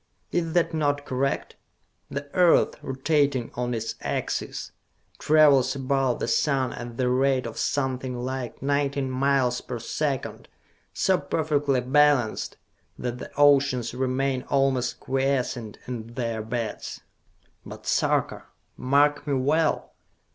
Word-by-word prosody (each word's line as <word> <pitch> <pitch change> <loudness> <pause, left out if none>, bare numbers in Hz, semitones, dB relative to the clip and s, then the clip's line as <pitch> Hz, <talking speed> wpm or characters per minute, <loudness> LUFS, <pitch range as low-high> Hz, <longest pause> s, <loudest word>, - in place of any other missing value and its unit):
Is 165 -2 -1
that 170 -1 +2
not 145 -2 0
correct! 135 +1 -2 0.5
The 140 +1 -5
Earth, 180 -3 +4
rotating 135 -2 0
on 125 0 -2
its 115 0 -3
axis, - - -3 0.5
travels 145 -4 +5
about 135 -2 0
the - - -2
sun 130 +1 +1
at 120 -1 -8
the 130 - +1
rate 130 0 +2
of 115 - -6
something 130 -2 -1
like 130 0 -5
nineteen 140 -1 0
miles 130 -1 +1
per 125 - -5
second, 135 +4 -3 0.4
so 190 -1 +2
perfectly 145 -2 0
balanced 135 -3 +2 0.4
that 125 0 -4
the - - -7
oceans 140 -5 +4
remain 130 +1 0
almost 135 -3 +1
quiescent 130 -4 -1
in 120 -2 -7
their 115 -3 -2
beds! 115 0 -4 0.6
But, - - -10
Sarka, - - 0 0.3
mark 145 +2 +2
me 140 - +1
well! 150 +5 +1
135 Hz, 120 wpm, -25 LUFS, 125-145 Hz, 0.6 s, travels